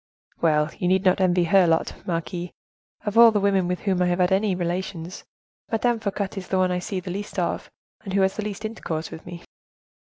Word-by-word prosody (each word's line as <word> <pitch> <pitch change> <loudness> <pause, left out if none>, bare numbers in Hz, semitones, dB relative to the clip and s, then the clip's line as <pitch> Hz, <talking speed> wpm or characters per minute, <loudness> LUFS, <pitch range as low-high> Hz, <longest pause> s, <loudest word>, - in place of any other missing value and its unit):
"Well, 155 -2 +2
you 180 - 0
need 190 +1 +2
not 185 +1 +3
envy 180 -1 +3
her 180 +1 +4
lot, 165 0 +1
marquise; 175 +1 -3 0.6
of 210 +2 +2
all 235 0 +10
the 215 -2 +1
women 195 -2 +2
with 180 0 -2
whom 190 -3 0
I 180 - +3
have 175 0 +1
had 180 -1 +2
any 195 0 +2
relations, 175 0 -4 0.5
Madame 235 +1 +1
Fouquet 200 -2 -2
is 185 - -5
the 190 - 0
one 185 -1 +2
I 180 - 0
see 190 +1 -3
the 180 0 -6
least 205 +3 -6
of, - - -2 0.3
and 195 - -6
who 200 - +3
has 190 0 +2
the 215 - -3
least 210 +1 -5
intercourse 165 -7 -4
with 160 - -10
me." 175 -1 -8
185 Hz, 220 wpm, -24 LUFS, 175-200 Hz, 0.6 s, all